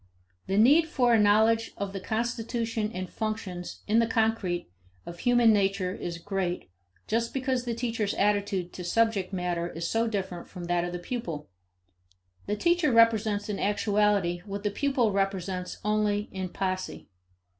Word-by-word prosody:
The 195 - 0
need 290 +9 +6
for 250 -7 +2
a 225 - +5
knowledge 220 +2 +3
of 200 -1 -4
the 195 - -3
constitution 225 +1 -2
and 185 -2 -4
functions, 210 -5 -5
in 220 +2 +3
the 230 - +3
concrete, 220 -6 0 0.4
of 170 0 -8
human 240 -2 +5
nature 195 -2 +1
is 170 -3 -5
great 180 - -3 0.3
just 230 +2 -1
because 260 -1 0
the 235 -1 -2
teacher's 230 -3 -1
attitude 200 -3 0
to 180 - -7
subject 210 0 +1
matter 175 -2 -2
is 165 0 -4
so 225 +4 +1
different 190 -5 -4
from 180 -3 -8
that 175 0 0
of 175 - -3
the 175 - -3
pupil. 175 -6 -5 1.0
The 205 - 0
teacher 340 +4 +2
presents 215 -2 -2
in 210 -2 -3
actuality 205 -3 +1
what 200 0 -6
the 205 - 0
pupil 260 -1 +1
represents 195 -2 -2
only 210 -1 +1
in 185 -1 -4
posse. 185 0 -3
205 Hz, 155 wpm, -28 LUFS, 185-225 Hz, 1.0 s, need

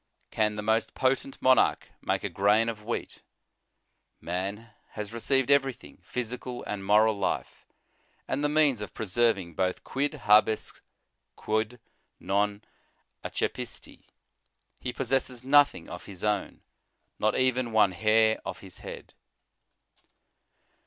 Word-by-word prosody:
Can 105 -1 +1
the 105 - -4
most 110 +1 0
potent 135 +1 0
monarch 130 -2 +4
make - - -1
a - - -2
grain 105 +3 +3
of 105 -2 -6
wheat? 115 +2 -4 1.0
Man 100 +6 -4 0.2
has 105 +1 -6
received 135 +3 +1
everything, 135 -3 +1
physical 125 +1 -5
and 100 -1 -5
moral 105 +2 +4
life, 100 -2 -3 0.6
and 140 +3 -1
the 145 - +2
means 150 -6 +3
of 105 - -7
preserving 105 -4 0
both, 90 +2 -1
quid 145 +3 -2
hades 105 +1 +3 0.5
quod 110 +3 -2 0.4
non 100 +1 0 0.6
accepi^tif - - -4 0.8
He 125 - -3
possesses 130 -1 -1
nothing 145 - +4
of - - -8
his 95 -3 -10
own, 105 -2 -1 0.6
not 110 0 +1
even 130 -2 +1
one 110 -3 +4
hair 110 +3 +3
of - - -6
his 95 -2 -13
head. - - -9
110 Hz, 120 wpm, -28 LUFS, 105-130 Hz, 1.0 s, monarch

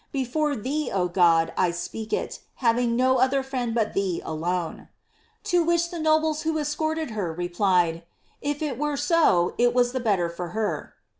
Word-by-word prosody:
Before 285 +3 -1
thee, 275 +7 -2
O 180 -2 +1
God, 170 -2 +3
I 185 - +2
speak 195 +6 -5
it, - - -2 0.2
having 235 -1 +1
no 260 +1 +3
other 265 +1 +2
friend 250 -3 -3
hut 215 -2 0
thee 190 -3 -1
alone 170 +1 -3 0.3
!" - - -38
To 350 -1 +4
which 340 +1 +1
the 345 - -5
nobles 310 0 +2
who 320 0 -1
escorted 315 -1 -2
her, 200 -6 -2
replied, 175 0 +1
^ - - -16 0.4
If 290 +1 -2
it 275 -5 -3
were 295 -1 -1
so, 290 - +3
it 240 0 +3
was 245 -1 +3
the 260 - -2
better 200 -7 +1
for 170 +1 -6
her." 215 -2 -2
245 Hz, 180 wpm, -25 LUFS, 180-295 Hz, 0.4 s, To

